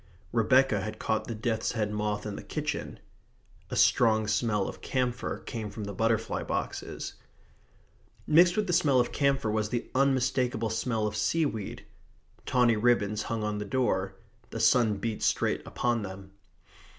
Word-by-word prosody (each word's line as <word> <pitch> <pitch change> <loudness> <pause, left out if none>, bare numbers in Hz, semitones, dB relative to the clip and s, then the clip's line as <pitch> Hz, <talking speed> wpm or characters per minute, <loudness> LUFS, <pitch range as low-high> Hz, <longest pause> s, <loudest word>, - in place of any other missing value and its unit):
Rebecca 120 -1 +3
had 110 +2 -5
caught 110 -1 -1
the 115 - -4
death's 110 0 -1
head 105 -3 -1
moth 105 0 -2
in 105 -1 -4
the - - -6
kitchen. - - -4 0.7
A - - -4
strong 110 -2 +4
smell 105 -1 +1
of - - -8
camphor 125 -2 -2
came 110 -3 -5
from 105 - -7
the 100 0 -5
butterfly 115 +2 0
boxes. - - -4 1.1
Mixed 175 +4 +5
with 210 - +2
the 180 - -1
smell 140 -5 +4
of 120 - +1
camphor 140 -5 +1
was 105 -1 0
the 120 0 -3
unmistakable 130 -3 +1
smell 110 -1 -1
of 105 0 -2
seaweed. 110 0 -1 0.6
Tawny 120 -3 +3
ribbons 105 -2 +2
hung 115 -2 -2
on 105 -1 -2
the - - -2
door. 100 -5 0 0.3
The - - -5
sun 115 -4 +4
beat 110 +1 -3
straight - - +1
upon 120 -2 0
them. 95 -1 -8
110 Hz, 155 wpm, -28 LUFS, 105-125 Hz, 1.1 s, Mixed